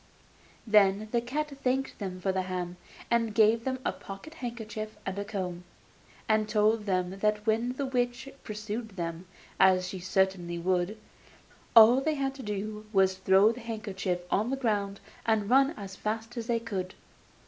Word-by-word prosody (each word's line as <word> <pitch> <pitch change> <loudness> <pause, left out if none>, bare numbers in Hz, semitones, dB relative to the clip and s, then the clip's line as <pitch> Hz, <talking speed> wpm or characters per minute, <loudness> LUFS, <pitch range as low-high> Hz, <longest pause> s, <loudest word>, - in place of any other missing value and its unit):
Then 210 -1 +4
the 235 - +2
cat 295 +5 -3
thanked 265 +1 0
them 185 -3 -4
for 190 +1 0
the 190 0 0
ham, 180 -1 -4 0.3
and 230 -3 +1
gave 225 +1 +4
them 260 0 -1
a - - +2
pocket 195 +11 -10
handkerchief 220 -6 -6
and 190 +1 -3
a - - -1
comb, 185 -4 -4 0.6
and 215 -1 +2
told 215 0 +2
them 185 0 -1
that 210 0 +1
when 230 +3 +1
the 275 +2 -3
witch 250 0 -1 0.2
pursued 215 0 -5
them, 170 0 -4 0.3
as 185 -1 +5
she 190 - -5
certainly 185 -1 0
would, 180 +4 0 0.8
all 230 +3 +9
they 310 +2 0
had 270 -1 -1
to 270 - -9
do 210 0 -4
was 190 -2 +4
to 190 - -16
throw 190 +3 +5
the 235 - -8
handkerchief 200 -5 -3
on 215 +4 +2
the 270 - -1
ground 205 -5 -1 0.3
and 220 -1 +1
run 270 +1 +6
as 195 -2 -7
fast 225 +4 -4
as 230 -2 -4
they 235 -1 +1
could. 195 -5 -4
215 Hz, 170 wpm, -29 LUFS, 190-235 Hz, 0.8 s, all